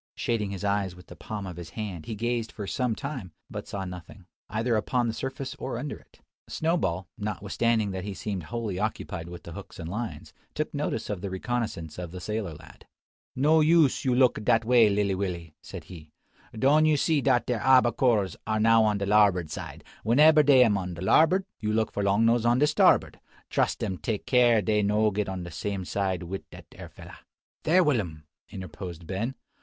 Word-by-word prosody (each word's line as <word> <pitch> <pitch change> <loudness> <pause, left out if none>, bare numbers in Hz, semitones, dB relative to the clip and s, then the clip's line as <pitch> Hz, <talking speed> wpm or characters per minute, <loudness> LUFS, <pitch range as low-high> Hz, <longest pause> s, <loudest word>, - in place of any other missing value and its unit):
Shading 110 -4 -1
his 100 0 -6
eyes 100 -3 0
with 90 - -15
the - - -12
palm 105 -2 -6
of 90 -2 -7
his 85 -2 -8
hand, 95 -5 -6
he 110 - -4
gazed 120 +1 -2
for 105 - -6
some 125 +2 -1
time, 130 - -6 0.2
but - - -6
saw 100 -1 -4
nothing, 90 +1 -10 0.2
either 115 +3 0
upon 120 +3 0
the 115 - -1
surface 135 +2 -5
or 130 - -4
under 145 - -4
it. - - -20 0.3
Snowball, 95 - -1
notwithstanding 105 +1 0
that 95 -1 -4
he 100 -1 -5
seemed 95 -6 -4
wholly 110 -4 -4
occupied 90 -5 -3
with 85 0 -9
the 85 - -9
hooks - - -10
and 80 - -6
lines, 110 +6 -5 0.2
took - - -2
notice - - -2
of 100 -4 -4
the 100 - -4
reconnoissance 95 -5 -3
of 90 -2 -5
the 90 +2 -8
sailor 105 -3 -4
lad. 75 - -16 0.5
"No 150 +5 +4
use 155 -3 +4
you 130 -2 +2
look 125 -4 +3
dat 115 +1 +3
way, 120 -2 +5
lilly 100 -1 +1
Willy," 90 -4 -4
said - - -9
he. 80 -4 -12 0.5
"Doan 150 +6 +4
you 155 -1 +3
see 155 0 +2
dat 130 -3 +2
de 125 - 0
abbacores 120 -5 +3
are 110 0 0
now 115 +1 +5
on 105 -1 +2
de 100 - -2
larbord 100 -5 +3
side. - - -7 0.2
Wheneber 150 +7 +6
dey 135 -3 +7
am 105 -4 +2
on 90 -2 -5
de 85 - -9
larbord, 160 - +4
you 105 -1 -1
look 110 0 0
for 100 - -3
long 100 +3 +2
nose 115 0 +3
on 120 +1 +3
de 145 - +4
starbord. - - +3 0.3
Truss - - +1
dem 95 -2 -4
take 105 +6 -3
care 120 -4 +4
dey 105 +2 +2
no 105 +1 +2
get 105 0 -2
on 95 -2 -4
de 85 - -8
same 95 +3 -4
side 95 -1 -1
wit' 95 +3 -7
dat - - -12
ere - - -10
fella." - - -13 0.5
"There, 180 +4 +5
Will'm!" 100 - -1 0.3
interposed 90 -3 -8
Ben. 110 +10 -3
105 Hz, 205 wpm, -27 LUFS, 95-120 Hz, 0.5 s, dey